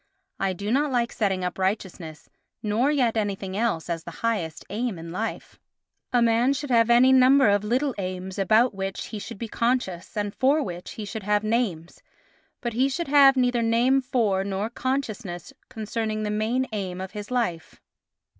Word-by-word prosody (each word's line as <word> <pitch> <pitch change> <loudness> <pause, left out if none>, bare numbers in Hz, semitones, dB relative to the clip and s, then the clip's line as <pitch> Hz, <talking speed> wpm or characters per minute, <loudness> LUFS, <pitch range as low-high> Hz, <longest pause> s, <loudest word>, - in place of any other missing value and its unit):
I 195 -1 0
do 200 +4 -4
not 285 +3 +2
like 240 -2 +1
setting 190 -4 -1
up 180 +1 -3
righteousness, 185 -5 -3 0.4
nor 220 +6 +1
yet 255 -6 +2
anything 195 -3 -2
else, 210 -7 -1
as 165 -2 -3
the - - -8 0.2
highest 175 -9 -2
aim 225 -2 -2
in 165 0 -8
life; 220 +6 -5 0.5
a 245 -1 +3
man 235 +3 +3
should 280 -1 -4
have 230 -1 +4
any 250 +2 +6
number 260 0 +6
of 205 0 +3
little 255 +6 0
aims 185 +1 -5
about 220 +5 +4
which 195 0 -4
he 215 - -5
should 200 - -8
be 230 - -5
conscious 230 -6 -1
and 205 -1 -2
for 285 +4 +2
which 175 -2 -7
he 215 - -6
should 220 +1 -6
have 210 +1 +1
names, 215 -7 -2 0.6
but 240 -2 -3
he 260 +4 +2
should 330 +3 -3
have 275 -2 +7
neither 245 -1 +2
name 240 +4 +3
for, 225 -7 +1
nor 200 +3 -3
consciousness 235 -9 -3 0.2
concerning 215 0 -3
the 210 - -2
main 225 +5 0
aim 190 -4 -4
of 190 0 -6
his 210 -1 -7
life. 230 -10 -2
220 Hz, 180 wpm, -25 LUFS, 195-245 Hz, 0.6 s, have